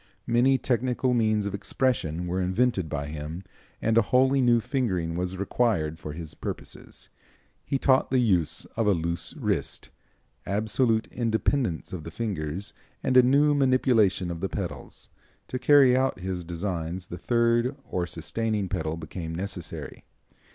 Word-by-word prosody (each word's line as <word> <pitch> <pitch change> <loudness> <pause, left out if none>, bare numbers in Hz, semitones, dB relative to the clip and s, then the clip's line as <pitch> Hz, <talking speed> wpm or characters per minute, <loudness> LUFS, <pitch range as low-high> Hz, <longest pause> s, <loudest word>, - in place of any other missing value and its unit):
Many 125 +3 +3
technical 125 0 0
means 110 -3 +2
of 100 - -3
expression 95 - -1
were 90 +2 -1
invented 95 -1 +1
by 70 -1 -3
him, 75 +4 -6 0.4
and 115 +1 +4
a - - +5
wholly 130 +5 +3
new 120 -2 +4
fingering 95 - -1
was 90 +1 -3
required 95 -6 0
for 75 -3 -6
his 80 -1 -7
purposes. - - -8 0.5
He 135 - -1
taught 130 0 +3
the 130 - +2
use 95 -10 +1
of 115 -2 +1
a 100 - +5
loose 85 +1 -3
wrist, - - -2 0.5
absolute 110 +3 +1
independence 115 - 0
of 85 -4 -5
the 85 - -6
fingers 95 -2 -4 0.3
and 130 - +1
a 130 - +10
new 140 +4 +4
manipulation 125 -9 +3
of 85 - -5
the 95 - -2
pedals. 95 -5 -6 0.4
To 130 - -3
carry 130 -1 +6
out 130 -5 +1
his 90 -1 -3
designs 85 0 -4
the 90 - -6
third 120 +4 +2
or 90 -1 -2
sustaining 105 +4 -2
pedal 80 -3 -2
became 80 0 -6
necessary. 90 -1 -6
100 Hz, 150 wpm, -26 LUFS, 85-125 Hz, 0.5 s, a